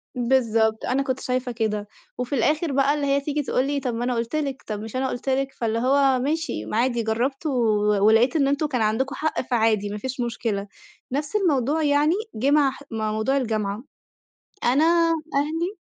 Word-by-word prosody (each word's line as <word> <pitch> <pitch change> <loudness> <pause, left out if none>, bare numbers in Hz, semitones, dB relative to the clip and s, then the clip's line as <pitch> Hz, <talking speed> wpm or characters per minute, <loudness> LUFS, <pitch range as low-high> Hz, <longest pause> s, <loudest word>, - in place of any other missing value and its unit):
بالضبط. 230 -3 +1
أنا 270 +2 +1
كنت 260 -1 -2
شايفة 250 -1 -2
كده، 210 -3 -2 0.3
وفي 250 +3 -2
الآخر 300 +6 +1
بقى 275 +1 +3
اللي 295 -1 -1
هي 280 0 +2
تيجي 295 +1 -2
تقول 260 0 0
لي: 285 0 0
"طب، 255 -3 -3
ما 240 - -2
أنا 245 -1 0
قُلت 230 +5 -2
لِك، 280 -3 -2
طب، 210 -1 -3
مش 225 +3 -8
أنا 265 +1 0
قٌلت 260 +1 -4
لِك." 270 +1 0
فاللي 230 -1 -1
هو 270 +1 +3
ماشي 315 +5 -2
ما - - -3
عادي 240 -1 +1
جرّبت 255 +7 -1
و 300 - +1 0.5
ولقيت 225 +6 +4
إن 280 -3 +3
أنتم 285 +2 +1
كان 250 -5 -1
عندكم 255 +6 0
حق، 315 0 -1
فعادي 225 -5 +1
ما 205 - -4
فيش 255 +4 -5
مشكلة. 225 -4 -2 0.4
نفس 290 +8 -3
الموضوع 310 - +1
يعني 295 +2 +3 0.2
جه 265 +6 +1
مع 290 -2 +4
ح 275 - -12
مع 220 -1 -2
موضوع 220 +6 0
الجامعة. 215 -3 -2 0.8
أنا 270 +6 +3 0.5
أهلي 325 +7 -1
260 Hz, 195 wpm, -24 LUFS, 225-285 Hz, 0.8 s, ولقيت